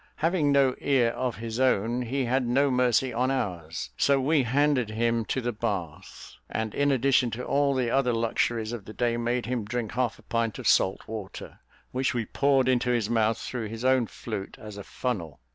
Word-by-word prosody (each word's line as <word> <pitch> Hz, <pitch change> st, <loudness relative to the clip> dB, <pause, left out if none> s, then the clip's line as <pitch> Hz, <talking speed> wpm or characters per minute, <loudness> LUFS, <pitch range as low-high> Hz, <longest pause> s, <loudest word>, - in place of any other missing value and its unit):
Having 160 Hz, -2 st, +1 dB
no 135 Hz, -2 st, +4 dB
ear 130 Hz, -4 st, +2 dB
of 125 Hz, 0 st, -2 dB
his 115 Hz, +3 st, -5 dB
own, 120 Hz, -1 st, +2 dB
he 130 Hz, +2 st, -1 dB
had 125 Hz, +1 st, +1 dB
no 135 Hz, +3 st, +3 dB
mercy 125 Hz, 0 st, +2 dB
on 125 Hz, +3 st, +1 dB
ours, 85 Hz, -, -3 dB
so 140 Hz, -1 st, +3 dB
we 145 Hz, +3 st, +3 dB
handed 130 Hz, -1 st, +2 dB
him 115 Hz, +1 st, 0 dB
to 130 Hz, -, -2 dB
the 120 Hz, 0 st, -1 dB
bath; 100 Hz, -9 st, -5 dB
and 110 Hz, -1 st, -3 dB
in 145 Hz, 0 st, +2 dB
addition 130 Hz, -1 st, +3 dB
to 120 Hz, +2 st, -5 dB
all 140 Hz, -1 st, +2 dB
the 125 Hz, -3 st, 0 dB
other 135 Hz, -2 st, +2 dB
luxuries 115 Hz, -1 st, 0 dB
of 115 Hz, -5 st, -6 dB
the 110 Hz, -, -9 dB
day, 120 Hz, 0 st, 0 dB
made 120 Hz, +1 st, -1 dB
him 120 Hz, -1 st, -2 dB
drink, 110 Hz, +1 st, -3 dB
half 125 Hz, -1 st, -1 dB
a -, -, -19 dB
pint 115 Hz, -2 st, -1 dB
of -, -, -4 dB
salt 95 Hz, -, +2 dB
water, 105 Hz, -4 st, -8 dB, 0.3 s
which 130 Hz, +1 st, -1 dB
we 115 Hz, -2 st, -1 dB
poured 135 Hz, +2 st, +2 dB
into 125 Hz, -1 st, +2 dB
his 120 Hz, -3 st, 0 dB
mouth 115 Hz, -1 st, +2 dB
through 115 Hz, -1 st, -5 dB
his 115 Hz, +3 st, -6 dB
own 130 Hz, -3 st, +3 dB
flute, 105 Hz, -4 st, -6 dB
as 105 Hz, -1 st, -9 dB
a 100 Hz, -, -7 dB
funnel. 90 Hz, -, -4 dB
120 Hz, 200 wpm, -27 LUFS, 110-130 Hz, 0.3 s, no